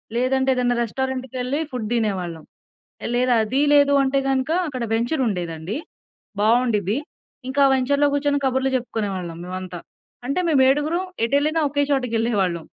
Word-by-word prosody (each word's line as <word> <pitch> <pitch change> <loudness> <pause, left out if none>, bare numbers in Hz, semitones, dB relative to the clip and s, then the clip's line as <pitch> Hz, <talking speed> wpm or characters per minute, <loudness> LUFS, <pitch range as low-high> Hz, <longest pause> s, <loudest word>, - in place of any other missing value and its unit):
లేదంటే, 265 +2 +1
ఏదన్నా 245 -1 +1
రెస్టారెంట్‌కేళ్ళి 260 +2 -3
ఫుడ్ 235 -4 -4
దినేవాళ్ళం. 185 -8 -2 0.7
లేదా, 250 0 +2
అది 255 +6 0
లేదు 285 -1 +5
అంటే 270 +1 +1
గనక 265 +1 0 0.2
అక్కడ 255 -4 -4
వెంచర్ 240 +5 0
ఉండేదండి, 175 - -3 0.6
బాగుండిద్ది. 220 -2 +2 0.5
ఇంకా 280 +2 +2
వెంచర్‌లో 280 +3 +2
కూర్చొని 285 0 +1
కబుర్లు 265 +1 0
చెప్పుకునేవాళ్ళం 195 -8 -4
మేమంతా. 185 -1 -6 0.5
అంటే 280 +7 0
మేము 285 -4 +4
ఏడుగురుం 305 +6 +1 0.2
ఎటు 235 - 0
వెళ్ళినా 310 +3 0
ఒకే 285 +1 +1
చోటకేళ్ళేవాళ్ళం. 225 - 0
250 Hz, 125 wpm, -22 LUFS, 210-275 Hz, 0.7 s, లేదు